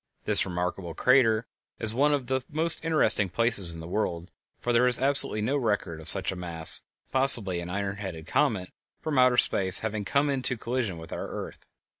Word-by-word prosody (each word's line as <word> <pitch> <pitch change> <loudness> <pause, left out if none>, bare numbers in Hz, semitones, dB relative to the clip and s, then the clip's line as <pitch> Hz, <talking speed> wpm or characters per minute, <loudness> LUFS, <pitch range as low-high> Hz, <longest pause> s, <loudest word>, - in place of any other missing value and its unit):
This - - +4
remarkable 90 -1 -5
crater 120 - +2 0.3
is 110 -1 +2
one 145 +5 +1
of 140 -3 -1
the 130 +1 -2
most 160 +2 +2
interesting 155 - +3
places 105 -2 +1
in 80 - -9
the 80 - -9
world, 85 -3 -4 0.3
for 120 - -2
there 120 +2 +3
is 125 -1 +4
absolutely 135 -6 +2
no 135 +6 -1
record 105 - -3
of 80 - -5
such 95 -1 +2
a - - -7
mass, 85 -3 +1 0.3
possibly 115 -9 +5
an 85 0 -7
iron 100 +1 -4
headed 90 -6 -8
comet, 100 - -1 0.3
from 150 -4 -2
outer 125 -1 +3
space 95 -4 +2
having 110 -1 -4
come 140 +8 0
into 130 -2 -2
collision 115 -6 -4
with 80 0 -10
our - - -6
earth. - - -9
110 Hz, 190 wpm, -26 LUFS, 90-130 Hz, 0.3 s, possibly